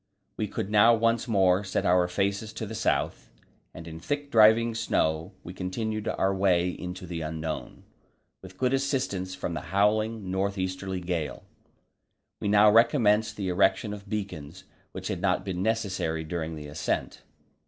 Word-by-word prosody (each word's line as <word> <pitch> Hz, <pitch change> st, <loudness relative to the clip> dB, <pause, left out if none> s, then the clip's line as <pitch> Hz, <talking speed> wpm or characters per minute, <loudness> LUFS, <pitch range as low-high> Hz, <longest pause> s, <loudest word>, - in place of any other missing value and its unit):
We -, -, -2 dB
could 100 Hz, -, -4 dB
now 110 Hz, +3 st, +6 dB
once 115 Hz, +1 st, +1 dB
more 95 Hz, -3 st, +3 dB
set 95 Hz, -, -2 dB
our 90 Hz, 0 st, +4 dB
faces 100 Hz, +4 st, -1 dB
to 110 Hz, -, -5 dB
the 110 Hz, -, -7 dB
south, -, -, -1 dB, 0.4 s
and 85 Hz, -, -10 dB
in 80 Hz, 0 st, -8 dB
thick 145 Hz, -, -3 dB
driving 115 Hz, +1 st, +5 dB
snow 80 Hz, -5 st, 0 dB
we 90 Hz, -, -8 dB
continued 110 Hz, +4 st, -3 dB
our 95 Hz, 0 st, +1 dB
way 90 Hz, -2 st, +2 dB
into 90 Hz, +1 st, -7 dB
the 85 Hz, -1 st, -5 dB
unknown, 80 Hz, 0 st, -5 dB, 0.6 s
with 95 Hz, 0 st, -13 dB
good 125 Hz, +3 st, +1 dB
assistance 130 Hz, -9 st, -1 dB
from 85 Hz, -, -4 dB
the 80 Hz, -, -4 dB
howling 105 Hz, +3 st, 0 dB
north 100 Hz, +1 st, -1 dB
easterly 95 Hz, 0 st, -3 dB
gale. 85 Hz, -4 st, -3 dB, 1.0 s
We -, -, -3 dB
now 105 Hz, +1 st, +6 dB
recommenced 110 Hz, -2 st, +3 dB
the 95 Hz, -3 st, -2 dB
erection 95 Hz, +3 st, +2 dB
of 100 Hz, -1 st, -10 dB
beacons, 95 Hz, -5 st, -5 dB, 0.3 s
which -, -, -6 dB
had -, -, -3 dB
not -, -, +1 dB
been 90 Hz, -2 st, -3 dB
necessary 95 Hz, -7 st, -1 dB
during 80 Hz, 0 st, -4 dB
the 75 Hz, -1 st, -8 dB
ascent. 75 Hz, +1 st, -3 dB
95 Hz, 160 wpm, -27 LUFS, 90-110 Hz, 1.0 s, now